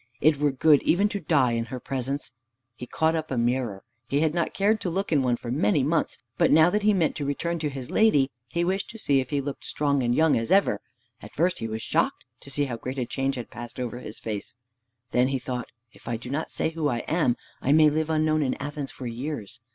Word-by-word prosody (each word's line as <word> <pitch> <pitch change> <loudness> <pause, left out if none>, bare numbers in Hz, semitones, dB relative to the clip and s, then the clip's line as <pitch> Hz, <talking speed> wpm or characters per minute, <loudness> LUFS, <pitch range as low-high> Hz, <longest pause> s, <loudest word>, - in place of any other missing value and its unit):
It 155 0 +4
were 150 0 +3
good 145 +2 +4
even 200 +5 +3
to 205 - -3
die 145 -7 +2
in 115 0 -1
her 130 +1 -6
presence." 135 +2 -4 0.4
He 125 +1 -9
caught 160 +5 +1
up 160 -1 -2
a 130 - -2
mirror. 120 -4 0 0.2
He 140 +2 +1
had 160 -1 +2
not 170 -1 0
cared 210 +2 +2
to 180 - -1
look 195 +3 -2
in 145 -4 +4
one 125 -2 +1
for 120 - -6
many 130 0 +2
months, 155 +3 0 0.2
but - - +5
now 160 +3 +6
that 210 - +1
he 210 +1 +4
meant 180 -6 +1
to 150 - -3
return 170 +4 -2
to 150 -1 -1
his 135 -3 -7
lady, 145 -12 +4 0.2
he 170 +8 -1
wished 190 +2 -1
to 225 - -9
see 140 -10 +2
if 130 - -3
he 145 -2 0
looked 140 0 -6
strong 140 -2 0
and 120 0 +1
young 160 -1 +4
as 115 0 -1
ever. 195 +1 +3 0.4
At - - -12
first 175 +4 +1
he 115 - -3
was 110 0 -4
shocked - - 0
to - - -13
see 145 +1 0
how 120 -4 -4
great 130 +3 -5
a 125 - 0
change 135 +2 -1
had 120 -2 -7
passed 120 0 -8
over 120 -1 -4
his 110 - -8
face. 105 0 -5 0.6
Then 125 +1 +3
he 135 0 0
thought, 125 -1 -5 0.2
"If - - -19
I 120 -1 -1
do 120 +2 -8
not 155 +3 -2
say 160 - -1
who 160 -2 -1
I 120 -4 0
am, 155 -7 +2 0.2
I 135 - +1
may 155 0 +6
live 155 +1 -1
unknown 155 0 +2
in 135 -3 0
Athens 145 -1 -5
for 130 - -9
years. 120 -2 -5
140 Hz, 250 wpm, -26 LUFS, 125-160 Hz, 0.6 s, now